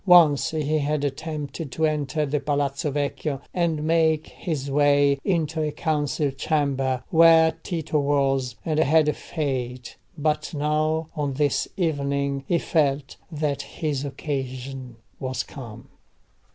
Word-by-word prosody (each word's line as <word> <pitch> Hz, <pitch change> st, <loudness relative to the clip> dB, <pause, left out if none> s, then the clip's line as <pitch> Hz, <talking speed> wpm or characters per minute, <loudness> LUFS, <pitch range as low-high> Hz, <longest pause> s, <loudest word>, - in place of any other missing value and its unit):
Once 170 Hz, -6 st, +6 dB
he 155 Hz, 0 st, 0 dB
had 145 Hz, 0 st, 0 dB
attempted 145 Hz, 0 st, -4 dB
to 160 Hz, -, +1 dB
enter 150 Hz, -1 st, 0 dB
the 145 Hz, +1 st, -1 dB
Palazzo 145 Hz, +1 st, -1 dB
Vecchio 145 Hz, 0 st, -2 dB
and 165 Hz, -4 st, 0 dB
make 160 Hz, -1 st, +2 dB
his 140 Hz, -6 st, -4 dB
way 145 Hz, -1 st, +4 dB
into 160 Hz, -4 st, 0 dB
a 150 Hz, -1 st, 0 dB
council 150 Hz, -2 st, 0 dB
chamber 135 Hz, -2 st, 0 dB
where 165 Hz, 0 st, +7 dB
Tito 160 Hz, -3 st, -1 dB
was, 135 Hz, -3 st, +1 dB
and 155 Hz, -1 st, 0 dB
had 155 Hz, 0 st, +4 dB
failed. 130 Hz, -5 st, -4 dB, 0.2 s
But 150 Hz, +1 st, -1 dB
now, 155 Hz, +2 st, 0 dB
on 145 Hz, -2 st, -1 dB
this 145 Hz, 0 st, +1 dB
evening, 140 Hz, -5 st, 0 dB
he 175 Hz, -, +3 dB
felt 145 Hz, -4 st, 0 dB
that 145 Hz, -2 st, -1 dB
his 145 Hz, 0 st, -3 dB
occasion 130 Hz, -3 st, -5 dB, 0.2 s
was 130 Hz, -1 st, -2 dB
come. 120 Hz, -2 st, -10 dB
145 Hz, 125 wpm, -24 LUFS, 140-155 Hz, 0.2 s, where